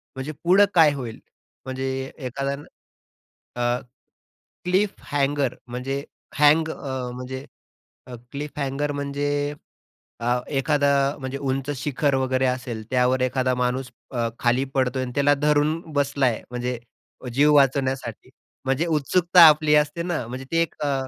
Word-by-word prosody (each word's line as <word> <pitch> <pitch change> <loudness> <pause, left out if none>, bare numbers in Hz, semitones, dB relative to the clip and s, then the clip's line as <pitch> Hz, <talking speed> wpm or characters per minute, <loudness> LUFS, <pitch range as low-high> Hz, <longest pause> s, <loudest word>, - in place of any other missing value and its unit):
म्हणजे 135 +3 -4
पुढं 185 +4 +6
काय 160 -4 +6
होईल 125 -5 -6 0.5
म्हणजे 130 0 -3
एखाद्या 135 0 -3 1.1
अ, 120 0 +1 0.9
क्लिफ 190 +3 +2 0.2
हँगर 140 -2 +1
म्हणजे 130 +3 -4 0.4
हँग 155 +2 +5
अ, 130 -5 -4
म्हणजे 130 +2 -6 0.9
क्लिफ 145 +1 -6
हँगर 140 +1 -1
म्हणजे 145 +1 -2 0.7
अ, 120 +1 +1
एखादा 145 0 +1 0.3
म्हणजे 130 0 -4
उंच 135 0 -2
शिखर 140 +1 0
वगैरे 130 0 +1
असेल, 125 -3 -2
त्यावर 125 0 +2
एखादा 130 0 +1
माणूस 125 0 -1 0.2
अ, 120 -3 -1
खाली 125 +2 +2
पडतोय 130 -1 0
आणि 125 - -5
त्याला 145 0 +4
धरून 150 +2 +2
बसलाय 140 -4 +1
म्हणजे 125 0 -3 0.5
जीव 145 +4 +4
वाचवण्यासाठी 135 -4 +1 0.4
म्हणजे 135 +5 +1
उत्सुकता 170 +3 +3
आपली 150 0 +4
असते 150 +3 +1
ना 170 -8 -2
म्हणजे 130 +2 -7
ती 165 - +1
एक 165 -1 +1
अ 145 -1 +1
135 Hz, 130 wpm, -24 LUFS, 130-145 Hz, 1.1 s, पुढं